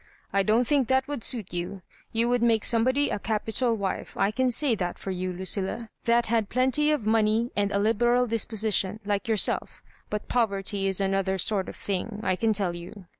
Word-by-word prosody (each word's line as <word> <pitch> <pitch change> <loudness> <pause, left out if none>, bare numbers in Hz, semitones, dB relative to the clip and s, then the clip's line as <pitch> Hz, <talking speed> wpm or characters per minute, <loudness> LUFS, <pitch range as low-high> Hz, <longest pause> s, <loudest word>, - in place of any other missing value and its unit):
" - - -36
I 200 - +3
don't 220 +5 +2
think 275 -2 +2
that 265 +1 +1
would 285 -6 -4
suit 230 -7 +1
yoa 180 +2 -5 0.3
You 230 +1 +1
would 245 0 +1
make 230 -2 +2
somebody 260 +5 +3
a - - -2
capital 225 +3 0
wife, 195 -3 -4
I 195 +1 +1
can 260 +3 0
say 260 +1 +3
that 180 -5 -3
for 195 - -5
you, 185 0 -3
Lucilla, 190 +5 -2
that 235 0 +3
had 225 -2 0
plenty 260 +4 +2
of 295 -8 0
money 220 +2 +1
and 200 -1 0
a 200 - 0
liberal 240 +4 +2
disposition 220 -3 0
like 205 +1 -2
yourself 220 -3 0 0.3
But 210 0 -4
poverty 200 -4 0
is 190 0 +1
another 195 0 0
sort 190 +1 +1
of - - -9
things 205 +2 -4
I 185 - +1
can 225 +4 +1
tell 195 -5 +1
you. 180 +3 -10
215 Hz, 200 wpm, -26 LUFS, 195-235 Hz, 0.3 s, I